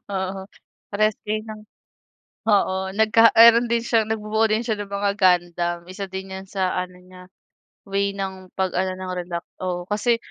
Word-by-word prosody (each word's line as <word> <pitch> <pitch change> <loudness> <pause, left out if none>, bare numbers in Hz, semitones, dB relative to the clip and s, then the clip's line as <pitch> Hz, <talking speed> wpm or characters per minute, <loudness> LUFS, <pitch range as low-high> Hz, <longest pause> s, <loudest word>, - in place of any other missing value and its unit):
Oo 190 0 -3 0.5
parehas 215 +1 +2
kayo 215 +1 -2
ng 215 -1 -8 0.9
oo 205 -3 +3 0.2
nagka 220 +2 +5
meron 235 +1 +8
din 235 - +2
siya 230 -2 +2
nagbubuo 220 0 -1
din 215 0 +1
siya 220 -3 -1
ng 205 - -5
mga 200 0 0
Gundam, 175 -2 +2
isa 190 +2 -6
din 190 0 -7
yan 190 - -7
sa 190 -2 -2
ano 180 0 -4
niya, 180 0 -15 0.7
way 200 0 0
ng 190 -1 -6
pag 190 -1 0
ano 185 +1 0
ng 185 0 -6
relax 175 -1 -4 0.2
oo, 180 -1 -2
kasi 215 +3 +2
195 Hz, 170 wpm, -23 LUFS, 185-215 Hz, 0.9 s, meron